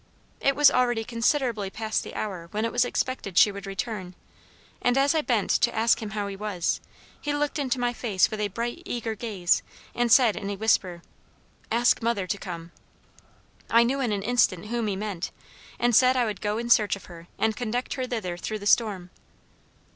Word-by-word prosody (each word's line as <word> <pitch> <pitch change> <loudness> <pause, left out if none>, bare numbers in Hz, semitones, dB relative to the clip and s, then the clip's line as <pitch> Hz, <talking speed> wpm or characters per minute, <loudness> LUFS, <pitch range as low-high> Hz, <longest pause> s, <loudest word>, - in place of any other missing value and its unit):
It 275 0 +2
was 295 0 +6
already 240 -3 +1
considerably 230 -3 0
past 220 +2 -2
the - - -9
hour 185 -6 -4
when 215 +4 -2
it 230 - -2
was 245 - +3
expected 245 -6 -3
she 210 - +7
would 200 0 -8
return, 195 -3 -5 0.7
and 245 +1 +2
as 275 +2 +4
I 315 - +2
bent 235 -8 0
to 235 - +2
ask 225 +1 +3
him 215 - -4
how 205 - -1
he 200 -1 -5
was, 195 -4 -2 0.4
he 290 0 -1
looked 295 +1 -1
into 260 -3 -1
my 245 0 0
face 215 -5 +1
with 215 - -4
a 210 - +1
bright 235 - -4
eager 235 -8 -3
gaze, 205 -5 0 0.3
and 240 -1 0
said 235 -4 +6
in 200 -2 -5
a 200 - -2
whisper, 190 -5 +1 0.7
'ask 240 +2 +3
mother 230 -4 0
to 190 - -2
come.' 170 -2 -7 1.0
I 230 +1 +6
knew 265 +4 0
in 250 -5 0
an 200 -1 -2
instant 210 -4 +1
whom 235 -2 -1
he 200 - -1
meant 195 -3 -4 0.5
and 240 -1 +2
said 255 +2 +5
I 245 - +3
would 210 -4 -4
go 210 +1 -1
in 235 +1 -3
search 210 -4 +4
of 200 - -12
her 170 -1 -12
and 220 -1 +1
conduct 245 +1 -2
her 255 -2 -3
thither 200 -8 -3
through 215 +4 -4
the 205 - -9
storm. 200 -5 +2
220 Hz, 200 wpm, -26 LUFS, 200-245 Hz, 1.0 s, she